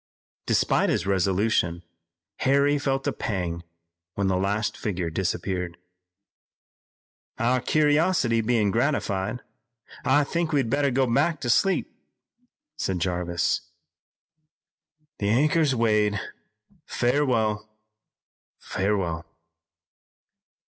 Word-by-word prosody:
Despite -, -, +2 dB
his -, -, 0 dB
resolution 95 Hz, -2 st, +1 dB, 0.5 s
Harry 140 Hz, +2 st, +2 dB
felt 135 Hz, -1 st, -1 dB
a -, -, 0 dB
pang 90 Hz, -5 st, -3 dB, 0.5 s
when 100 Hz, -, -1 dB
the 95 Hz, -, +1 dB
last 100 Hz, +3 st, -1 dB
figure 90 Hz, -5 st, -3 dB
disappeared. 90 Hz, -1 st, -2 dB, 1.6 s
"Our 125 Hz, +2 st, +1 dB
curiosity 150 Hz, -5 st, +2 dB
bein' 110 Hz, -3 st, +1 dB
gratified, 115 Hz, -4 st, -1 dB, 0.6 s
I 145 Hz, +2 st, +4 dB
think 170 Hz, +3 st, -2 dB
we'd 135 Hz, -6 st, +1 dB
better 140 Hz, 0 st, +2 dB
go 130 Hz, +1 st, +2 dB
back 145 Hz, +7 st, +1 dB
to 120 Hz, -, +1 dB
sleep," 195 Hz, +9 st, +1 dB, 0.8 s
said 95 Hz, -, -1 dB
Jarvis. 85 Hz, -1 st, -1 dB, 1.6 s
"The 100 Hz, -, 0 dB
anchor's 150 Hz, +4 st, +3 dB
weighed, 105 Hz, -3 st, +2 dB, 0.7 s
farewell, 115 Hz, -5 st, 0 dB, 0.9 s
farewell!" 95 Hz, -4 st, -2 dB
110 Hz, 90 wpm, -25 LUFS, 95-135 Hz, 1.6 s, I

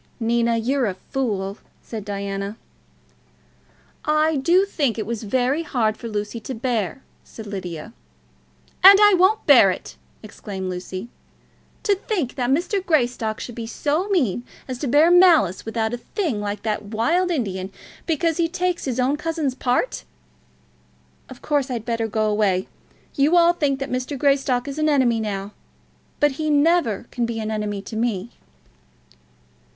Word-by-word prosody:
"Nina, 235 Hz, 0 st, +1 dB
you're 255 Hz, +2 st, 0 dB
a 190 Hz, -, -3 dB
fool," 200 Hz, -4 st, -3 dB, 0.2 s
said 220 Hz, -3 st, -6 dB
Diana. 200 Hz, +1 st, -4 dB, 1.5 s
"I 305 Hz, +1 st, +2 dB
do 345 Hz, +8 st, +3 dB
think 285 Hz, -, -1 dB
it 215 Hz, -, -3 dB
was 230 Hz, 0 st, -4 dB
very 255 Hz, +7 st, 0 dB
hard 235 Hz, -9 st, 0 dB
for 230 Hz, -, -8 dB
Lucy 210 Hz, +1 st, -4 dB
to 255 Hz, +4 st, -6 dB
bear," 235 Hz, 0 st, -2 dB, 0.2 s
said 220 Hz, -, -11 dB
Lydia. 190 Hz, -1 st, -6 dB, 0.9 s
"And 390 Hz, +1 st, +11 dB
I 415 Hz, -1 st, +7 dB
won't 375 Hz, +4 st, +3 dB
bear 250 Hz, -9 st, +7 dB
it!" 185 Hz, -, -5 dB, 0.3 s
exclaimed 195 Hz, -3 st, -6 dB
Lucy. 185 Hz, +4 st, -6 dB, 0.7 s
"To 415 Hz, -3 st, +3 dB
think 375 Hz, -, -2 dB
that 250 Hz, -2 st, -2 dB
Mr. 350 Hz, +7 st, 0 dB
Greystock 245 Hz, -, 0 dB
should 240 Hz, -, -7 dB
be 230 Hz, -1 st, -6 dB
so 305 Hz, -, -1 dB
mean 250 Hz, -, +1 dB, 0.2 s
as 255 Hz, -2 st, -5 dB
to 285 Hz, -, -2 dB
bear 300 Hz, +7 st, +5 dB
malice 335 Hz, -, +5 dB
about 225 Hz, 0 st, -1 dB
a -, -, -2 dB
thing 295 Hz, -, -3 dB
like 205 Hz, 0 st, -4 dB
that 215 Hz, -1 st, -1 dB
wild 310 Hz, -, +1 dB
Indian 195 Hz, -, -2 dB, 0.4 s
because 325 Hz, 0 st, 0 dB
he 335 Hz, -1 st, +1 dB
takes 360 Hz, 0 st, -2 dB
his 255 Hz, -2 st, -2 dB
own 265 Hz, +4 st, +1 dB
cousin's 315 Hz, -4 st, -2 dB
part! 255 Hz, -, -1 dB, 1.3 s
Of 260 Hz, -, -12 dB
course 285 Hz, -3 st, 0 dB
I'd 235 Hz, -3 st, -4 dB
better 230 Hz, -1 st, -1 dB
go 215 Hz, 0 st, 0 dB
away. 205 Hz, -3 st, +1 dB, 0.5 s
You 295 Hz, +5 st, +3 dB
all 340 Hz, 0 st, +5 dB
think 290 Hz, -5 st, 0 dB
that 275 Hz, 0 st, -4 dB
Mr. 255 Hz, +3 st, -3 dB
Greystock 270 Hz, -2 st, +1 dB
is 280 Hz, +2 st, -5 dB
an 310 Hz, 0 st, +2 dB
enemy 255 Hz, -6 st, +3 dB
now; 200 Hz, -2 st, -4 dB, 0.7 s
but 295 Hz, 0 st, +4 dB
he 310 Hz, -1 st, -1 dB
never 290 Hz, -, +2 dB
can 240 Hz, -2 st, -1 dB
be 230 Hz, -1 st, -4 dB
an 220 Hz, 0 st, -3 dB
enemy 210 Hz, -2 st, -3 dB
to 220 Hz, -, -8 dB
me." 225 Hz, -1 st, -2 dB
245 Hz, 155 wpm, -22 LUFS, 215-305 Hz, 1.5 s, And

